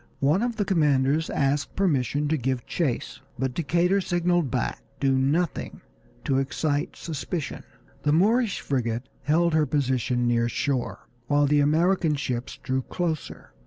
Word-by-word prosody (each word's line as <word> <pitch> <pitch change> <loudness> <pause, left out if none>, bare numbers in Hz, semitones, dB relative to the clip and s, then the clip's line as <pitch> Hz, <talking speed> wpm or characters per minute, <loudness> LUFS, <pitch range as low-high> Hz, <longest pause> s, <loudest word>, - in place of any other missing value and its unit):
One 150 +8 +3
of 240 -1 -1
the 210 -2 -1
commanders 150 -4 +2
asked 140 0 0
permission 145 -5 +1
to 160 - +2
give 130 -3 -2
chase, 145 -9 -2 0.2
but 130 0 -1
Decatur 175 +6 +1
signaled 175 -4 +1
back 125 -1 -2 0.2
"Do 135 -1 +2
nothing 140 +7 0 0.4
to 135 -1 +1
excite 145 +2 -1
suspicion." 160 0 -4 0.4
The 145 - +1
Moorish 210 +6 +2
frigate 120 -2 -2
held 170 +2 +2
her 155 -1 +3
position 125 -3 0
near 120 0 +2
shore 130 +1 -2 0.2
while 145 +1 +3
the 145 +1 +3
American 160 +2 +3
ships 125 -3 -3
drew 130 0 0
closer. 160 +2 -4
145 Hz, 140 wpm, -25 LUFS, 130-170 Hz, 0.4 s, One